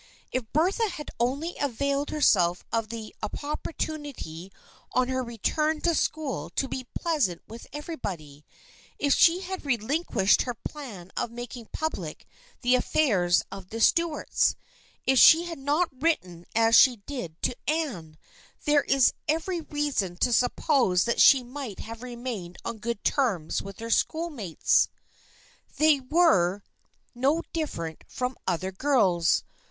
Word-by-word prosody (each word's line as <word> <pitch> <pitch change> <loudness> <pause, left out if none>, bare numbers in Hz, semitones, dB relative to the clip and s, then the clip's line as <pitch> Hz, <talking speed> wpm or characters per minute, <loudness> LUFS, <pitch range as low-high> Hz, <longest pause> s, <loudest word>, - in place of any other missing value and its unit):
If 250 -4 -3
Bertha 380 - +2
had 305 -5 -7
only 280 +8 -1
availed 280 +1 -1
herself 180 - +3
of 225 -2 0
the 225 -2 -7
op 215 - -4
portunity 290 - -5 0.4
on 255 0 +2
her 260 0 0
return 305 +7 -1
to 340 - +2
school 285 - -2
to 270 - 0
be 255 -1 -5
pleasant 290 - 0
with 230 +2 -10
everybody, 180 - -6 0.5
if 285 -1 +2
she 345 +2 +5
had 380 0 -5
relinquished 240 - +1
her 245 -2 -3
plan 215 - -8
of - - -1
making 240 0 -8
public 315 0 -4 0.4
the 245 +1 +3
affairs 210 - +2
of 195 -2 -9
the 225 - -5
Stuarts, 335 +6 +2 0.5
if 265 -1 +4
she 330 +2 +8
had 340 -4 -6
not 295 +5 +1
written 180 - -1
as 225 0 +5
she 255 -3 +7
did 180 - -6
to 250 - 0
Anne, 235 - -2 0.5
there 295 -1 +4
is 270 -2 +4
every 330 +3 -1
reason 290 - -2
to 240 - +2
suppose 245 - +2
that 235 - +1
she 270 -3 +7
might 250 -4 -7
have 230 +1 -8
remained 235 -8 -6
on 225 - -4
good 235 -1 -4
terms 205 - 0
with 195 -1 -9
her 230 0 -5
schoolmates. 290 - +1 0.9
They 305 -2 +5
were 215 - +3 0.5
no 275 +7 +1
different 170 - -4
from 250 0 -3
other 185 +1 -1
girls. 190 -7 +2
250 Hz, 135 wpm, -27 LUFS, 200-300 Hz, 0.9 s, she